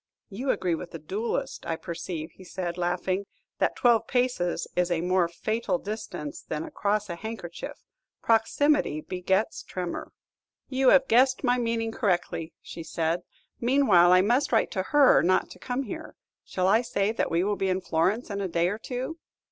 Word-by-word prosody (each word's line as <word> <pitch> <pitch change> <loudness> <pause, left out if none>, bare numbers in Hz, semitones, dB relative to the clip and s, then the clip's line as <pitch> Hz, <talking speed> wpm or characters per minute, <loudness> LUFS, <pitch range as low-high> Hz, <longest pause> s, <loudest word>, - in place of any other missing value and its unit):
"You 250 +8 -4
agree 180 -7 +1
with 170 +2 -4
the - - -7
duellist, 195 +9 -3
I 165 - 0
perceive," 165 -1 -5
said 180 -1 -4
he, 180 - -5
laughing, 185 +3 -1 0.3
"that - - +1
twelve 235 -3 +3
paces 245 -9 0
is 180 0 +2
a 175 -2 +1
more 180 0 +2
fatal 215 +4 -1
distance 205 -7 -6
than 150 - -4
across 210 +3 -1
a 170 - -4
handkerchief: 190 -3 -7 0.4
proximity 225 - +2
begets 190 +5 -1
tremor." 180 -2 -5 0.6
"You 260 -1 +3
have 270 -1 +5
guessed 260 +4 +4
my 250 -1 +3
meaning 230 -1 -1
correctly," 175 -7 -1
said 165 0 -2 0.4
she; - - -9
"meanwhile, 235 -9 +5
I 185 0 +7
must 240 +8 +2
write 225 - +2
to 190 - -1
her 290 -3 +6
not 185 +3 +2
to - - -12
come 255 +2 -2
here. - - -7 0.3
Shall 185 0 -1
I 215 +4 +5
say 210 -4 0
that 225 - -1
we 170 +2 +1
will 205 +1 +1
be 195 -1 -1
in 185 0 +1
Florence 185 +7 0
in 200 0 -2
a 195 - -1
day 170 0 +1
or 205 +3 -4
two?" 255 +7 -5
195 Hz, 175 wpm, -27 LUFS, 175-235 Hz, 0.6 s, I